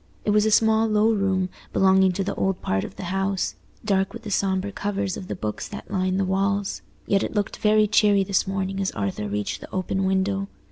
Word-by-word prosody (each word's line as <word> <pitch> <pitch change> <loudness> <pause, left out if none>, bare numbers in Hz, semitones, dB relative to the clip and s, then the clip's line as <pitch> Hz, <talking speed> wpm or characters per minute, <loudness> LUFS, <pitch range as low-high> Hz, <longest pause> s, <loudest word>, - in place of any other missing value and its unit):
It 210 - +2
was 210 +1 +4
a - - +3
small 220 +1 +4
low 215 +1 +3
room, 190 -2 0 0.2
belonging 190 0 +4
to 195 - -1
the 200 - -2
old 190 -1 -1
part 95 0 0
of - - -8
the - - -7
house—dark 195 0 -1
with 230 - -9
the 210 - -6
sombre 195 0 0
covers 200 -1 -2
of 185 - -7
the - - -4
books 105 -1 -4
that 205 - -9
lined 185 -1 0
the 195 - +1
walls; 195 +1 0 0.2
yet 195 -1 +2
it - - -3
looked 205 -1 -1
very 215 0 +4
cheery 205 -1 +4
this 195 -1 0
morning 195 0 -2
as 195 -1 0
Arthur 105 0 -3
reached 105 0 -3
the - - -11
open 190 +1 -1
window. 190 +1 0
195 Hz, 215 wpm, -24 LUFS, 190-205 Hz, 0.2 s, was